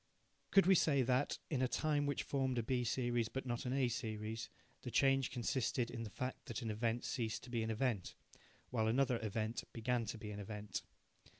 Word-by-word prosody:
Could 195 - +6
we 190 - +7
say 145 -6 +4
that, 130 +3 +2
in 135 -4 +1
a 130 - +4
time 145 +2 +1
which 145 - 0
formed 130 -2 0
a 120 - +1
B 125 +2 +1
series 120 -1 +1
but 135 0 -4
not 120 0 -2
an 125 - 0
A 135 -2 +3
series, 110 -1 -3 0.3
the 125 - -5
change 135 0 +4
consisted 120 0 0
in 115 - -4
the 115 - -4
fact 130 +5 -5
that 115 -2 -4
an 110 - -1
event 115 +2 0
ceased 115 -4 -2
to 125 - -10
be 115 -2 0
an 110 - -1
event, 110 -4 0 0.6
while 110 -3 +2
another 125 +1 +3
event 110 +2 -1
began 120 0 0
to 110 +2 -4
be 105 -1 -6
an 105 - -5
event? 105 0 -4
120 Hz, 205 wpm, -38 LUFS, 110-130 Hz, 0.6 s, we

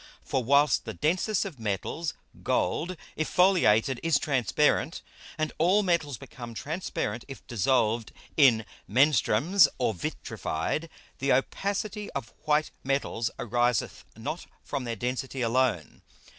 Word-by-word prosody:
For 130 - -1
whilst 140 +4 +4
the - - -5
densest 185 +7 +1
of 165 -10 -7
Metals, 110 - -2 0.3
Gold, 170 - 0 0.2
if 155 - -2
foliated, 135 - +4
is 165 -3 +3
transparent, 140 +3 +1 0.3
and 155 -1 -1
all 185 +6 +4
Metals 165 - 0
become 120 +1 -9
transparent 140 - -3
if 135 -2 -10
dissolved 115 0 +1 0.2
in 120 -7 +5 0.2
Menstruums 145 - +4
or 125 -3 +1
vitrified, 85 - -3 0.3
the 135 +1 +1
Opacity 200 - -1
of 135 -4 -5
white 150 0 +2
Metals 135 -4 -1
ariseth 120 -1 0
not - - -5 0.2
from 140 -3 -4
their 115 -1 -2
Density 130 +3 -3
alone. 115 -7 0
135 Hz, 120 wpm, -28 LUFS, 115-160 Hz, 0.3 s, in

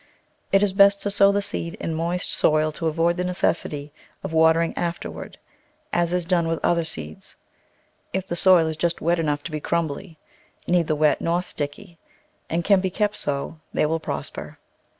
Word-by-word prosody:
It 195 +1 +4
is 200 -2 +1
best 200 0 +6
to 205 - -1
sow 200 0 +5
the 200 0 0
seed 170 -3 -4
in 165 - -4
moist 170 +3 -2
soil 155 0 +2
to 165 +2 -3
avoid 165 +2 +1
the 180 - -1
necessity 150 -5 -1 0.3
of - - -5
watering 160 +1 +3
afterward, 170 0 -5 0.6
as 175 -1 +1
is 180 -1 0
done 170 -2 +1
with 165 0 -1
other 170 -1 +2
seeds; 80 - -7 0.8
if 190 -1 -2
the 175 - -4
soil 180 -2 +5
is 160 -1 -3
just 170 +1 -1
wet 170 +1 +1
enough 150 -2 -1
to - - -6
be 155 - -3
crumbly, 165 +2 -3 0.5
neither 170 -3 +2
wet 150 0 +2
nor 170 +2 0
sticky, 165 +3 -6 0.5
and 170 +1 -1
can 195 +1 +4
be 190 - 0
kept 210 +2 0
so, 145 +3 -2 0.2
they - - +3
will 160 +2 0
prosper. - - -6
170 Hz, 180 wpm, -23 LUFS, 160-180 Hz, 0.8 s, best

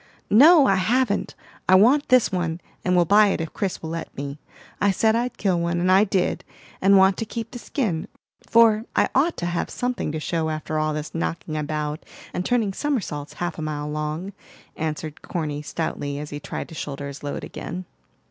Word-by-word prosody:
"No, 295 +7 +8
I 195 -6 +3
haven't! 220 +3 +1 0.3
I 185 - +8
want 255 +10 +5
this 255 -3 +5
one, 175 -3 -1 0.2
and 180 0 +2
will 175 -1 +4
buy 210 +4 +6
it 195 - 0
if 165 -1 -4
Chris 195 -4 -3
will 160 - -4
let 165 0 -6
me. 140 +1 -5 0.4
I 200 - +4
said 220 +3 +3
I'd 245 +2 -1
kill 185 -4 +1
one, 170 0 0
and 180 +1 +2
I 195 +3 +6
did, 190 -2 0 0.4
and 195 +1 +6
want 190 0 +5
to - - -2
keep 230 +1 -6
the 245 - -7
skin; 210 - -2 0.4
for 225 -1 +5
I - - +3
ought 310 +6 +2
to 175 - -3
have 175 0 -2
something 250 -10 -2
to 155 - -3
show 160 0 -1
after 155 0 -2
all 155 0 0
this 150 0 -5
knocking 165 -1 -3
about 150 0 -3 0.3
and 180 - -2
turning 220 -3 +1
somersaults 190 - -3
half 175 -1 -4
a - - -3
mile 150 -1 -3
long," 155 +6 -3 0.4
answered 155 -1 -4
Corny 150 -4 -3
stoutly, 145 -2 -3
as 150 +1 -6
he 145 - -5
tried - - -6
to - - -11
shoulder 140 -2 -5
his 140 0 -8
load 145 -1 -4
again. 180 +2 -6
175 Hz, 200 wpm, -23 LUFS, 155-215 Hz, 0.4 s, No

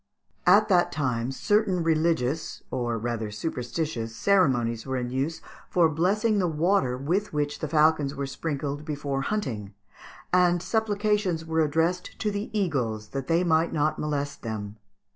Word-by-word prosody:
] - - -24
At - - +1
that 180 -3 +4
time 125 -4 -1
certain 185 - +1
religious 160 -3 0
or 120 -2 -1
rather 115 -1 -3
superstitious 120 0 -3
ceremonies 120 - +2
were 130 -1 -3
in 125 -1 -3
use 140 +6 -2 0.3
for 170 -3 +4
blessing 200 +7 +1
the 180 - +2
water 160 -5 +1
with 175 +10 -1
which 145 -1 -1
the 155 - -2
falcons 150 -2 +3
were 140 0 -2
sprinkled 145 0 -4
before 145 -3 -3
hunting, 115 - -3 0.6
and 180 -1 +4
supplications 210 -6 0
were 160 0 +1
addressed 165 +4 0
to 210 - -1
the 205 +1 -4
eagles 130 - -1
that 135 -1 -4
they 165 +2 +3
might 165 -1 +2
not 155 0 +1
molest 145 -2 -2
them. 110 -2 -5
150 Hz, 150 wpm, -26 LUFS, 130-175 Hz, 0.6 s, that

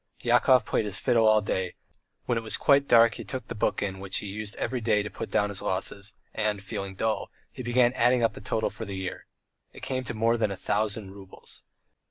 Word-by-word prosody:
Yakov 130 -2 +4
played 110 - 0
his 100 -3 -3
fiddle 115 -2 +3
all 110 0 +5
day; 95 -3 -2 0.5
when 120 - 0
it 115 - -1
was 110 - 0
quite 140 -1 +4
dark 115 -1 +6
he - - -7
took 130 -1 -6
the - - -5
book 105 - 0
in 95 -1 -3
which 95 -1 -2
he - - -3
used 105 +1 -4
every 130 -2 -2
day 105 -2 +2
to 105 - -6
put - - -6
down 105 - +1
his 100 - -4
losses, 100 +2 -2 0.2
and, 105 -2 -1
feeling 100 -1 -5
dull, 110 +2 -1 0.2
he - - -8
began 120 0 +3
adding 125 -1 +3
up 115 -2 +2
the - - -10
total 110 +2 -1
for - - -7
the 100 -3 -5
year. 95 -1 -5 0.5
It - - -13
came 130 -1 -2
to 120 - -4
more 115 +2 +2
than 110 -2 +1
a 100 - -5
thousand 105 0 -2
roubles. 95 -1 -12
110 Hz, 230 wpm, -27 LUFS, 100-115 Hz, 0.5 s, dark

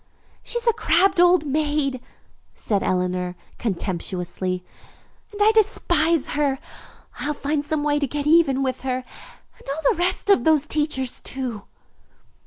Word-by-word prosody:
"She 480 - -3
is 475 - -3
a 465 - +5
crabbed 380 -3 +2
old 355 -3 +5
maid," 290 -2 0 0.5
said 205 -3 0
Eleanor 180 -1 -1 0.2
contemptuously, 185 -2 -3 0.7
"and 415 - -10
I 420 +1 +6
despise 340 -7 +2
her. 285 -2 0 0.6
I'll 300 0 -2
find 290 +1 -1
some 295 0 -1
way 295 0 +1
to 285 - 0
get 290 +2 -3
even 300 -4 +4
with 260 -1 -2
her, 255 -1 -2 0.6
and - - -12
all 290 +2 +1
the - - -10
rest 370 +3 +1
of 395 - +4
those 310 -2 +3
teachers, 295 -4 -2
too." 250 -6 -5
290 Hz, 145 wpm, -23 LUFS, 255-325 Hz, 0.7 s, I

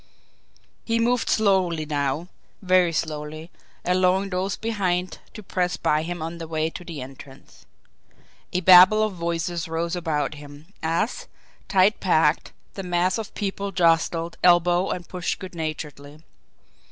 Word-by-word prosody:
He 230 0 0
moved 240 +1 +1
slowly 185 -7 +2
now, 145 +2 -2 0.3
very 185 -2 +3
slowly 155 0 -4 0.3
allowing 185 +2 +2
those 185 +2 -2
behind 185 -5 -2 0.2
to 215 - -9
press 180 -1 -1
by 150 0 +1
him 170 0 -5
on 165 +1 -6
the 165 - -6
way 160 0 -1
to 180 - -8
the 160 -6 -7
entrance. 135 +1 -14 0.8
A 180 - 0
babel 185 +4 +8
of 215 -2 -1
voices 170 -1 -3
rose 165 +2 -2
about 155 -5 -1
him, 145 +4 -13
as, 215 - -1 0.4
tight 195 +2 +3
packed, 160 -4 +2 0.2
the 195 - -6
mass 180 +2 0
of 220 - -7
people 200 0 -3
jostled, 165 -1 +1
elbowed, 175 +1 +4
and 175 -1 -10
pushed 180 -2 -3
good 185 -1 -9
naturedly. 150 -2 -6
175 Hz, 140 wpm, -24 LUFS, 160-185 Hz, 0.8 s, babel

